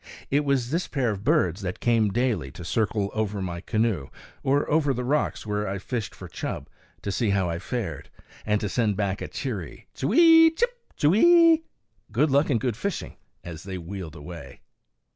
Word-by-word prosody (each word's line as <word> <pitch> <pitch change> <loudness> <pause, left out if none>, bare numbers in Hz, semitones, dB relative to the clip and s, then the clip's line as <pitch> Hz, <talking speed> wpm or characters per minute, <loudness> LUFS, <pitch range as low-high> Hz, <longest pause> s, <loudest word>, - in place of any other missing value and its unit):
It 145 +2 +3
was 135 -3 0
this 170 +3 0
pair 130 -6 0
of 100 -1 -5
birds 90 0 +2
that 90 -2 -4
came 115 -3 +2
daily 110 - 0
to 85 - -9
circle 105 0 0
over 105 -2 -1
my 85 -2 -4
canoe, 110 - 0 0.3
or 140 +2 +1
over 145 -3 +2
the 125 - -3
rocks 145 0 0
where 105 0 -2
I 95 +1 -2
fished 115 +3 -4
for - - -9
chub, - - -5 0.4
to 100 - -2
see 110 +2 0
how 100 -2 +1
I 85 - -3
fared, 95 - -4 0.3
and 105 -1 +1
to 105 - -1
send 105 -1 0
back 100 -1 -1
a - - -3
cheery 105 - -5
Ch'wee! 325 - +6
chip, 485 +6 +1 0.2
ch'weeee! 330 - +6 0.5
"good 140 +7 +2
luck 140 +3 +3
and 120 -5 +2
good 120 -1 -1
fishing," 200 - -4 0.3
as 80 -2 -8
they 95 -1 -6
wheeled 90 -2 -7
away. 80 +2 -10
110 Hz, 180 wpm, -25 LUFS, 95-140 Hz, 0.5 s, Ch'wee